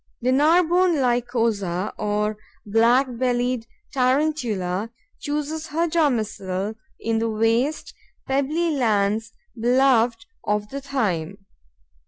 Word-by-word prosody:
The 250 +1 +1
Narbonne 340 +5 +4
Lycosa, 230 -7 0
or 210 0 -1 0.3
Black 230 +5 +4
bellied 245 -2 0 0.3
Tarantula, 250 -8 0 0.3
chooses 300 +2 -3
her 325 +3 0
domicile 220 - -1 0.3
in 225 0 0
the 230 0 0
waste, 225 +7 0 0.3
pebbly 295 +5 0
lands 220 -4 +1 0.2
beloved 240 -1 +2 0.2
of 210 0 -1
the 275 +1 -5
thyme. 195 - -2
240 Hz, 95 wpm, -23 LUFS, 215-280 Hz, 0.3 s, Narbonne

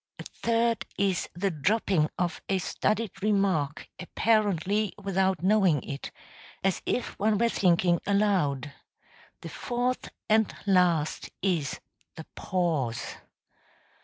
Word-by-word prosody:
A - - -7
third 230 0 0
is 195 -3 0
the 195 +2 0
dropping 175 -1 +1
of 175 -1 -2
a 195 - +2
studied 210 +4 -1
remark 195 -8 0
apparently 205 0 +1
without 190 -2 0
knowing 190 - +3
it, 140 0 -6 0.5
as 195 -1 +1
if 245 - -2
one 210 +1 +2
were 235 +2 +2
thinking 175 -4 +2
aloud. 180 -9 +1 0.7
The - - -7
fourth 250 +1 -2 0.2
and 220 -1 +3
last 175 -6 +2
is 165 -8 0 0.4
the 160 - -9
pause. 155 -11 -2
190 Hz, 110 wpm, -28 LUFS, 170-210 Hz, 0.7 s, knowing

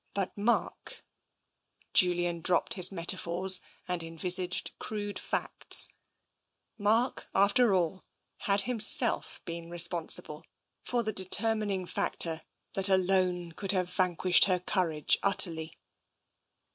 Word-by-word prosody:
But 195 -2 -2
Mark... 210 +4 -3 0.9
Julian 175 -1 +1
dropped 175 +1 -1
his 185 -1 +6
metaphors 185 +1 +1 0.3
and 180 -1 -3
envisaged 175 +3 -1
crude 205 -1 -5
facts - - -1 0.4
— - - -51
Mark, 235 +4 -1
after 200 +2 +3
all, 180 +1 -2 0.3
had 200 0 -1
himself 245 +4 +2
been 170 0 -8
responsible 170 -2 +1 0.4
for 240 -1 -2
the 215 0 -4
determining 200 0 +1
factor 165 -2 -2 0.3
that 195 0 +4
alone 185 -2 0
could 195 +4 -3
have 180 -2 -2
vanquished 180 0 +3
her 185 -2 0
courage 170 -5 -1
utterly. 165 -5 +2
185 Hz, 105 wpm, -28 LUFS, 175-200 Hz, 0.9 s, his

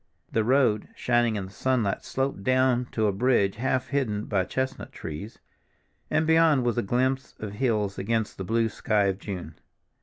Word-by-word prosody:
The 110 - +1
road, 120 -3 +2
shining 120 -2 +2
in 100 -2 -3
the 95 - -11
sunlight, 120 -3 0
sloped 135 -7 -2
down 130 0 +2
to 110 - +1
a 105 - +3
bridge 100 -2 +2
half 130 +1 -1
hidden 115 -7 -1
by 95 -3 0
chestnut 130 +5 -3
trees, 80 +9 -7 0.7
and 155 - +2
beyond 160 -4 +4
was 120 0 +1
a - - +2
glimpse 130 +5 -1
of 105 -2 -6
hills 105 -3 -1
against 110 +1 -1
the - - -2
blue 115 +4 +1
sky 105 -1 0
of 95 -1 0
June. 90 -6 -7
115 Hz, 175 wpm, -26 LUFS, 100-130 Hz, 0.7 s, beyond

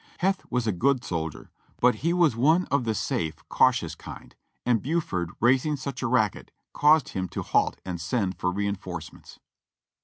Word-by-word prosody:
Heth 190 +1 0
was 125 -2 0
a 110 - +2
good 125 +7 +1
soldier, 80 -5 -4 0.3
but 125 0 +5
he 165 +4 0
was 170 -8 +3
one 160 +9 +3
of 140 -4 +2
the 110 -1 0
safe, 80 -5 -2
cautious - - +3
kind, - - -11 0.3
and 120 -3 +2
Buford 130 - -1
raising 130 +5 +3
such 135 -1 -5
a 130 - 0
racket 110 -5 +1 0.2
caused 150 -1 +4
him 95 -1 -3
to - - -4
halt - - +1
and 90 -2 -4
send 95 +1 -1
for 90 - 0
reinforcements. 95 -4 -5
120 Hz, 165 wpm, -26 LUFS, 95-140 Hz, 0.3 s, but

